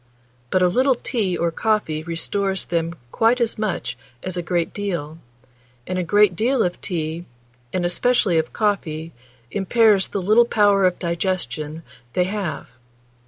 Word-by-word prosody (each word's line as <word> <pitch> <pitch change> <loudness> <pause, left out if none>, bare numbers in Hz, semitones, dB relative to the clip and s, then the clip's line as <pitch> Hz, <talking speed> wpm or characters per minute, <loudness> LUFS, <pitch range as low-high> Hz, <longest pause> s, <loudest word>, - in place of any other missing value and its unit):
But 185 +6 +2
a - - +6
little 255 +8 +3
tea 210 -8 -1
or 170 0 0
coffee 185 -5 0
restores 190 +4 -2
them 170 0 -1 0.2
quite 230 +3 +3
as 230 -2 0
much 210 -4 -2 0.3
as 185 -1 -4
a 175 - -1
great 170 -1 -1
deal; 170 -6 -4 0.7
and 185 0 -2
a - - 0
great 205 +1 +4
deal 240 +5 +2
of 180 -1 -2
tea, 165 -1 -3 0.5
and 180 -1 -1
especially 185 -1 +2
of 160 - -2
coffee, 165 -7 -1 0.4
impairs 205 0 +3
the 200 - -3
little 215 +5 +5
power 205 -4 +3
of 180 - -1
digestion 170 -3 -2 0.3
they 180 - +3
have. 185 - -4
185 Hz, 150 wpm, -22 LUFS, 170-210 Hz, 0.7 s, a